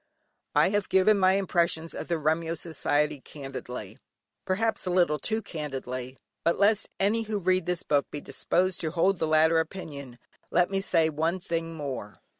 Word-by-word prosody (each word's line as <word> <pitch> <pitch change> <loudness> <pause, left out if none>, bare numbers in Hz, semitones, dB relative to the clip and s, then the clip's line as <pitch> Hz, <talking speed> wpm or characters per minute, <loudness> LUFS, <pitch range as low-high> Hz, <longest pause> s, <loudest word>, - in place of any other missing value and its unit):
I - - +5
have 205 0 0
given 195 +2 +4
my 185 0 +5
impressions 170 -4 0
of - - -6
the 170 - 0
Remyo 160 +2 0
society 150 -3 0
candidly, 130 -7 -7 0.5
perhaps 220 +2 0
a - - +1
little 175 -4 +3
too 220 +8 -1
candidly; 130 -4 -5 0.3
but 170 - +2
lest 205 +1 +3
any 210 +4 +2
who 215 -1 -2
read 185 -2 +1
this 180 -1 -1
book 145 -1 +1
be 145 - -5
disposed 180 +7 -1
to 160 - -1
hold 180 +3 +2
the 160 - 0
latter 160 +1 +4
opinion, 145 -7 -6 0.3
let 175 +1 +2
me 195 0 0
say 165 -4 +2
one 165 +4 0
thing 165 -2 -3
more. 130 -9 -5
165 Hz, 170 wpm, -27 LUFS, 150-185 Hz, 0.5 s, I